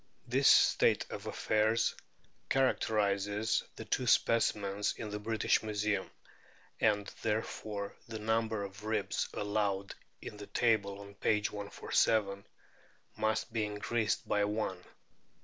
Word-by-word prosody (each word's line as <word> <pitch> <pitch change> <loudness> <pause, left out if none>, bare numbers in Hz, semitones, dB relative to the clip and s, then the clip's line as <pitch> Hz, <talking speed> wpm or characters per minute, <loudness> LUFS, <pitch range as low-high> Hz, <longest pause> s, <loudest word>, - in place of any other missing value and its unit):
This 135 +3 +3
state - - +5
of - - -6
affairs 110 +2 +1 0.6
characterises 105 -4 +1
the - - -8
two - - -1
specimens 105 -3 +2
in 110 -2 -5
the 105 - -3
British 110 +1 +1
Museum, 105 -2 -1 0.7
and 105 -2 +2 0.2
therefore 105 -2 -3
the 115 -1 -5
number 110 -1 0
of 100 +1 -9
ribs 110 -2 -1
allowed 100 -1 -1 0.3
in 105 - -8
the 105 - -9
table 105 -4 +1
on 100 0 -11
p. 105 +1 +1
147 100 -1 0 0.7
must 110 +1 -1
be 110 -2 +1
increased 105 +2 -1
by 105 - +2
one. 100 -3 -2
105 Hz, 115 wpm, -33 LUFS, 100-110 Hz, 0.7 s, state